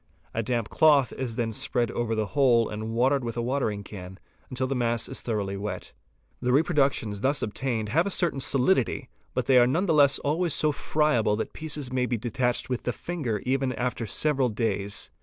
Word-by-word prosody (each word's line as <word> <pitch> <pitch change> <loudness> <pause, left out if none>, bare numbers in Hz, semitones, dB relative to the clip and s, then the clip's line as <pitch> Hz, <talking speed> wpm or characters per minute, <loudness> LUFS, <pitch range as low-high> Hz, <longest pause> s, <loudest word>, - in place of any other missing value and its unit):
A 115 - 0
damp 115 -1 -2
cloth 145 -5 +4
is 125 -4 -4
then 115 -1 -1
spread 120 +2 -1
over 115 -1 -1
the 110 -1 0
whole 125 -5 +4
and 110 +1 -5
watered 130 +4 +2
with 115 0 -4
a - - 0
watering 115 -5 -1
can 95 -2 -9 0.3
until 130 0 -2
the 135 - -1
mass 120 -2 0
is - - -4
thoroughly 100 -4 -2
wet. 105 +2 -5 0.5
The 125 0 +1
reproductions 135 - +1
thus 140 +4 +1
obtained 110 -1 -2
have 165 - +2
a - - 0
certain 175 -7 0
solidity, 130 - +1 0.3
but - - 0
they.none 130 +7 +4
the 165 - +2
less 145 -2 +5
are - - -9
always 160 +2 0
so 155 - +2
friable 140 -8 +1
that 110 - -4
pieces 150 -5 -5
may 125 -1 +1
be 120 - -1
detached 120 +2 -1
with 125 -2 -2
the 125 - -1
finger 125 - -3
even 130 0 0
after 125 -1 -2
several 135 0 +2
days. 105 -3 -2
125 Hz, 195 wpm, -26 LUFS, 110-140 Hz, 0.5 s, less